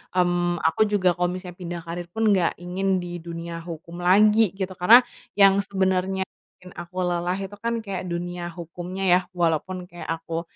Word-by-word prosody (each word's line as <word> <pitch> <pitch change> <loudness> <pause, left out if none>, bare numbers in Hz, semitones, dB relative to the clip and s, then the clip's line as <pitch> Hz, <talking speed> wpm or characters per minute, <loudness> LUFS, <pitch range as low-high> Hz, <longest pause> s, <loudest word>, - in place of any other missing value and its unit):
mmm, 175 -1 +1
aku 165 - 0
juga 185 -4 +3
kalo 180 0 +1
misalnya 180 0 -7
pindah 175 -1 -5
karier 170 +1 -5
pun 225 +4 -2
nggak 180 -3 +1
ingin 190 +2 -1
di 175 -1 -6
dunia 170 0 -6
hukum 170 +1 -8
lagi, 210 +3 +5
gitu. 190 -1 -3
Karena 215 +8 +8 0.4
yang 195 0 +6
sebenernya 190 -1 0 0.3
bikin 180 0 -14
aku 175 +1 -9
lelah 175 +1 -1
itu 195 0 -6
kan 230 -1 -2
kayak 190 -2 -4
dunia 175 0 -4
hukumnya 175 +3 -6
ya, 180 -1 +5 0.2
walaupun 175 +2 0
kayak 175 -1 -10
aku 165 0 -3
180 Hz, 170 wpm, -24 LUFS, 175-190 Hz, 0.4 s, Karena